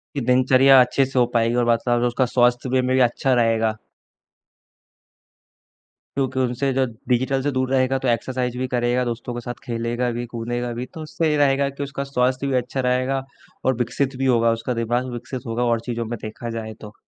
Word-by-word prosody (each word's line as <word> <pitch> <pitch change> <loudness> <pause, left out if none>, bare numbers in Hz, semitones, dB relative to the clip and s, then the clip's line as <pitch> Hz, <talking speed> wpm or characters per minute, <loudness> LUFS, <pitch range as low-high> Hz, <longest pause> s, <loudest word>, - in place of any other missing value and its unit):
कि 140 - -1
दिनचर्या 130 +1 +5
अच्छे 125 +2 +3
से 135 0 -2
हो 125 - +5
पाएगी 115 0 +2
और 120 - 0
मतलब 120 +1 +1
उसका 120 +2 +1
स्वास्थ्य 120 +1 +2
वे 130 -1 +3
में 130 0 0
भी 130 - +3
अच्छा 125 +2 +1
रहेगा। 115 -2 +2 2.4
क्योंकि 130 -1 0
उनसे 130 +2 0
जो 130 0 +2 0.2
डिजिटल 130 +2 +1
से 145 - 0
दूर 130 0 -1
रहेगा, 130 0 +2
तो 130 -1 -2
एक्सरसाइज़ 125 +1 -1
भी 130 - -1
करेगा, 125 0 +1
दोस्तों 120 0 -4
के 120 - -4
साथ 120 0 -6
खेलेगा 120 0 -2
भी, 120 +1 -4
कूदेगा 120 +1 -4
भी। 125 +2 -4
तो 160 - -7
उससे 160 +1 -1
ये 150 - +1
रहेगा 140 -1 +3
कि 140 +1 -7
उसका 140 0 -4
स्वास्थ्य 130 0 0
भी 135 - -1
अच्छा 125 +2 -2
रहेगा 130 +1 0 0.4
और 130 - +3
विकसित 130 +2 -1
भी 135 - -1
होगा, 115 -2 +3
उसका 115 +2 -3
दिमाग 120 +2 -1
विकसित 120 +2 -6
होगा 115 +2 -1
और 115 -1 +1
चीज़ों 120 -1 -4
में 120 +1 -5
देखा 115 +2 -6
जाए 110 0 -6
तो। 105 -1 -10
125 Hz, 200 wpm, -22 LUFS, 120-130 Hz, 2.4 s, दिनचर्या